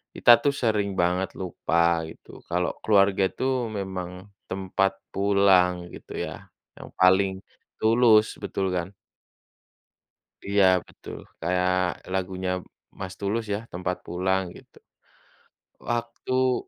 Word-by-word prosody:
kita 120 - +6
tuh 140 -1 +2
sering 105 -4 0
banget 90 +2 0
lupa 85 -2 +1
gitu - - -13
kalau 90 0 0
keluarga 100 -2 +3
itu 130 +1 -1
memang 95 -3 -5 0.3
tempat 95 0 0 0.2
pulang 95 -3 +3
gitu - - -11
ya, - - -9 0.3
yang - - -10
paling 95 +1 +3 0.3
tulus 110 -1 +5
betul 95 -2 -2
kan? 90 +2 -3 1.5
Iya, 100 0 +2 0.2
betul, - - -10 0.2
kayak 90 +2 +1 0.4
lagunya 95 0 -2 0.5
Mas 95 -1 -5
Tulus 110 +3 -1
ya, 100 - -1
tempat 90 +1 -3
pulang, 95 +2 0
gitu. - - -17 1.0
Waktu, 125 +2 -1
95 Hz, 110 wpm, -25 LUFS, 90-105 Hz, 1.5 s, kita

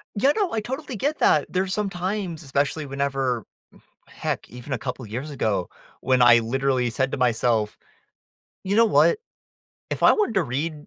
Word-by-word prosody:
Yeah, 265 +7 +4
no. 405 -5 0
I 225 - 0
totally 260 +4 -5
get 290 +9 -1
that. 150 -2 +3
There's 190 0 0
some 210 -1 -1
times, 185 -2 -3
especially 140 +2 -1
whenever 135 -4 -1 0.6
Mm, - - -20
heck, - - -4
even 125 +3 -7
a - - 0
couple 125 -1 -5
years 125 +8 -5
ago, 110 -9 -1 0.3
when 130 -1 +2
I 120 -1 +7
literally 130 +1 0
said 130 +3 0
to - - -2
myself, 120 -3 +1 0.9
"You 195 +2 0
know 230 0 +6
what? 320 - +4 0.7
If - - -1
I - - +8
wanted 420 - 0
to 190 - +3
read, 150 +3 -4
140 Hz, 175 wpm, -24 LUFS, 125-195 Hz, 0.9 s, I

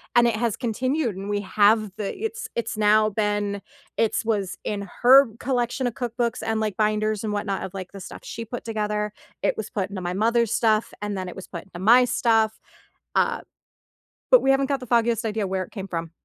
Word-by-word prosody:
and 240 0 +6
it 230 - +1
has 225 -1 -1
continued 255 0 -1
and 195 +2 -6
we 205 0 0
have 210 +1 +3
the 210 -2 -3
it's 450 +1 -4
it's 230 -1 -2
now 215 0 +4
been 205 -1 -1 0.4
it’s 225 0 +1
was 205 -5 -1
in 200 -3 -3
her 265 +3 +8
collection 245 0 -1
of 240 - -3
cookbooks 240 -1 -2
and, 225 0 0
like, 215 -3 -1
binders 215 0 +1
and 215 - -2
whatnot 200 -1 -2
of, 185 - -6
like, 185 -2 -7
the 195 - -8
stuff - - -9
she 230 - -6
put 235 +2 -7
together. 210 -1 -2 0.3
It - - +1
was 220 - -4
put 195 -3 -2
into 195 -2 -6
my 175 0 -2
mother's 230 +3 +2
stuff, 220 -1 +2
and 205 -1 -3
then 185 -1 -4
it - - -9
was 190 - -9
put 170 -2 -7
into 175 -2 -11
my 235 +6 +6
stuff, 225 -2 +2 0.6
uh, - - +2 0.9
but - - +8
we 270 - +3
haven't 270 0 +3
got 275 -1 0
the 250 - -9
foggiest 235 -1 +2
idea 215 -1 -1
where 190 0 -1
it - - -14
came 195 -3 -6
from. 165 -3 -4
215 Hz, 215 wpm, -24 LUFS, 200-235 Hz, 0.9 s, her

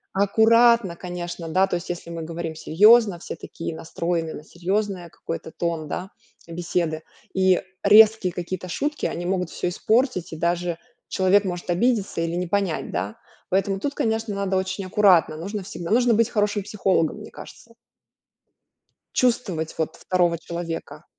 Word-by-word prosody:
аккуратно, 220 0 +4
конечно, 175 -1 -6
да, 185 +4 +3
то 185 - -1
есть 175 +1 -5
если 175 -1 -5
мы 165 -1 -5
говорим 165 0 -5
серьёзно, 205 +5 +5
все - - -7
такие 165 -1 -7
настроены 165 0 -3
на - - -9
серьёзное 185 +2 -2
какое-то 165 -1 -7
тон, 165 -2 -3
да, 185 +5 -4 0.4
беседы. 170 -1 -2 0.3
И 190 -1 +3 0.2
резкие 210 -2 +6
какие-то 185 +2 -5
шутки, 290 - -2
они 175 - -4
могут 180 -1 -1
всё - - -3
испортить, 220 -1 0
и - - -4
даже 170 +1 -1 0.3
человек 190 +2 +3
может 180 -1 -4
обидеться 200 0 +1
или 165 0 -1
не 180 0 -2
понять, 175 -7 -1
да. 95 +4 -3 0.4
Поэтому 195 +1 +1
тут, 285 +6 -2
конечно, 220 -3 -1
надо 195 -1 0
очень 190 +1 -3
аккуратно, 185 -5 +4
нужно 200 +6 -4
всегда 175 -2 -7
нужно 240 +1 +4
быть 230 +1 +3
хорошим 210 -3 0
психологом, 195 -5 0
мне 210 - -10
кажется. 230 - -13 1.4
Чувствовать, 195 -10 0
вот, 160 - -2
2 175 -2 +1
человека. 170 0 -6
185 Hz, 150 wpm, -23 LUFS, 170-205 Hz, 1.4 s, резкие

